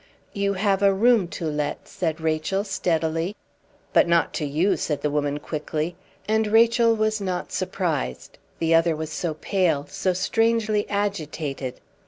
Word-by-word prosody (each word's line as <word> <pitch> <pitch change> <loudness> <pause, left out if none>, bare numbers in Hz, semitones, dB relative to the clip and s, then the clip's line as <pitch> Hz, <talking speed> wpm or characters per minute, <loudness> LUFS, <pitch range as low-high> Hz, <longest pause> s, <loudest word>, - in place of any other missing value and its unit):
"You 200 0 0
have 195 0 +1
a 200 -1 +5
room 225 -2 +4
to 170 - -6
let," 150 -1 -2
said 165 -3 -2
Rachel, 160 +5 0
steadily. 165 -2 -1 0.6
"But - - +5
not 170 -2 +2
to 155 - -2
you," 155 +8 +1
said 150 -3 -2
the 150 - +1
woman, 145 -1 0
quickly; 155 +2 -3 0.3
and 220 0 +2
Rachel 230 +1 +4
was 215 -1 0
not 185 -2 -3
surprised, 65 0 -3 0.2
the 165 0 +1
other 165 0 +4
was 155 0 -5
so 165 -3 -2
pale, 165 -4 0
so 190 -1 -1
strangely 215 +2 +1
agitated. 155 -10 -3
175 Hz, 150 wpm, -24 LUFS, 155-205 Hz, 0.6 s, a